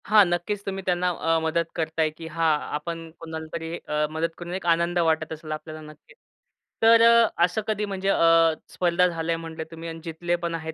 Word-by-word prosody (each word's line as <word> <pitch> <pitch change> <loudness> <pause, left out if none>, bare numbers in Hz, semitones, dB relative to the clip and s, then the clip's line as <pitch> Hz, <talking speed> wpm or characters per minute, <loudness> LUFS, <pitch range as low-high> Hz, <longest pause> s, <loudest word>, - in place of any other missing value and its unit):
हां, 210 -1 +7
नक्कीच 175 +4 -2
तुम्ही 195 -1 -4
त्यांना 180 0 +1
अ, 165 -1 0
मदत 160 +1 0
करताय, 160 -1 0
की 160 +1 -10
हां 165 0 +1 0.3
आपण 165 +1 -6
कुणालातरी 160 0 -6
अ, 150 0 +1
मदत 160 +1 -1
करून 175 0 -7
एक 185 -1 -5
आनंद 170 +1 +2
वाटत 160 -1 +1
असेल 155 0 -9
आपल्याला 155 0 -6
नक्कीच. - - -20 0.7
तर 230 0 +7
अ, 230 0 +7 0.2
असं 180 +5 -2
कधी 210 -1 -1
म्हणजे 195 -1 -2
अ, 165 -2 +5 0.2
स्पर्धा 180 0 +2
झालंय 165 -1 -2
म्हटले 165 -1 -6
तुम्ही 165 0 -7
आणि 165 0 -7
जितले 170 +1 -2
पण 170 -1 -3
आहेत 160 -1 -5
165 Hz, 190 wpm, -25 LUFS, 160-180 Hz, 0.7 s, हां